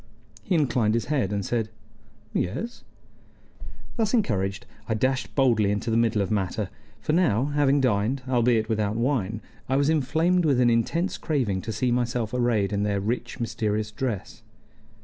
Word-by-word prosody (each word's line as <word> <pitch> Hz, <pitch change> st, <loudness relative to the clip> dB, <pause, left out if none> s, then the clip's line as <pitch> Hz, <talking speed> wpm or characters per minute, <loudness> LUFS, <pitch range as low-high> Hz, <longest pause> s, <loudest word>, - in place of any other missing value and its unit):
He 175 Hz, -, -1 dB
inclined 120 Hz, -8 st, +2 dB
his 115 Hz, -, 0 dB
head 125 Hz, -9 st, 0 dB
and 100 Hz, -2 st, -2 dB
said, 115 Hz, -3 st, -1 dB, 0.6 s
"Yes?" 225 Hz, -, -3 dB, 1.1 s
Thus 225 Hz, +1 st, +2 dB
encouraged, 100 Hz, -, 0 dB, 0.2 s
I 110 Hz, -, +1 dB
dashed 130 Hz, +4 st, -1 dB
boldly 115 Hz, -7 st, +3 dB
into 105 Hz, +3 st, -1 dB
the -, -, +1 dB
middle 115 Hz, -3 st, +2 dB
of 95 Hz, -, -4 dB
matter; 100 Hz, 0 st, -1 dB, 0.3 s
for 150 Hz, -, -1 dB
now, 135 Hz, -, +3 dB
having 145 Hz, -1 st, +3 dB
dined, 125 Hz, +2 st, +1 dB
albeit 120 Hz, -3 st, +2 dB
without 110 Hz, -2 st, 0 dB
wine, 115 Hz, -4 st, -1 dB, 0.3 s
I 135 Hz, -, +2 dB
was 140 Hz, +2 st, +3 dB
inflamed 160 Hz, +5 st, +2 dB
with 140 Hz, -5 st, +3 dB
an 120 Hz, -1 st, +4 dB
intense 165 Hz, +11 st, 0 dB
craving 120 Hz, -, 0 dB
to 110 Hz, -, -5 dB
see 120 Hz, +4 st, 0 dB
myself 120 Hz, -2 st, -1 dB
arrayed 115 Hz, -5 st, +1 dB
in 100 Hz, -, 0 dB
their 105 Hz, -1 st, 0 dB
rich, 120 Hz, +5 st, -3 dB
mysterious 110 Hz, -2 st, -1 dB
dress. 115 Hz, -3 st, -4 dB
115 Hz, 160 wpm, -25 LUFS, 105-135 Hz, 1.1 s, an